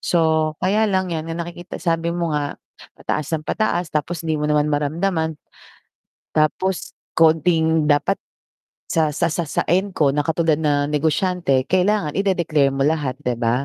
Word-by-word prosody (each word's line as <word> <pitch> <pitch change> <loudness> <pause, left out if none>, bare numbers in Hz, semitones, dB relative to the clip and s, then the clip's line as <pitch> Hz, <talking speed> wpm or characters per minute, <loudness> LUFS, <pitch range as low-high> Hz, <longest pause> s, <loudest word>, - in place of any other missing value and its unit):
So, 160 -2 +1
kaya 215 +3 +2
lang 185 -3 0
yan 160 0 -3
na 165 - -4
nakikita 175 +1 -8
sabi 165 -1 -1
mo 170 -2 -1
nga 145 -1 -2 0.4
pataas 155 -1 -3
nang 155 - -9
pataas 175 -5 -1
tapos 160 +2 -2
'di 155 -2 -1
mo 150 - 0
naman 150 0 +2
maramdaman. 160 +2 -1 1.0
Tapos 175 +5 0 0.2
konting 160 0 +3
dapat 150 +6 +2 0.8
sa 160 -3 +3
sa 170 -2 +1
sa 170 -2 -2
sa - - -1
end 190 +3 0
ko 140 -3 +3
na 150 - 0
katulad 160 0 +1
na 145 -2 +2
negosyante 150 -1 +1
kailangan 185 -2 +1
ide-declare 170 -7 +1
mo 135 - +1
lahat 145 -4 0
'di 125 - +1
ba? 120 +3 +1
160 Hz, 160 wpm, -21 LUFS, 150-175 Hz, 1.0 s, konting